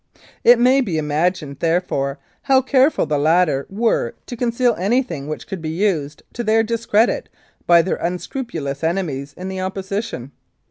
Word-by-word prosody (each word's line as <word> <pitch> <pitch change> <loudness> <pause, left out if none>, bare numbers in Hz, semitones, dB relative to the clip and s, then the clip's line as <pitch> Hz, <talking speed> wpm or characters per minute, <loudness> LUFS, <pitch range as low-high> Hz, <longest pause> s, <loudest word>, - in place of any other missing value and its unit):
It 240 +1 +7
may 255 +3 +4
be 185 -11 -2
imagined, 150 -1 -1
therefore, 165 -5 0 0.2
how 265 -1 +3
careful 265 - +3
the 150 -1 0
latter 155 -2 +2
were 205 - 0
to 245 - -6
conceal 240 0 +1
anything 195 - 0
which 155 - -5
could 190 -3 -6
be 160 - -4
used 160 -5 -1
to 240 - -4
their 225 0 +3
discredit 230 - +1 0.4
by 170 -1 +6
their 185 - -1
unscrupulous 170 - -4
enemies 160 -5 -2
in 185 - -6
the 190 0 -4
opposition. 190 - -4
185 Hz, 150 wpm, -20 LUFS, 155-230 Hz, 0.4 s, It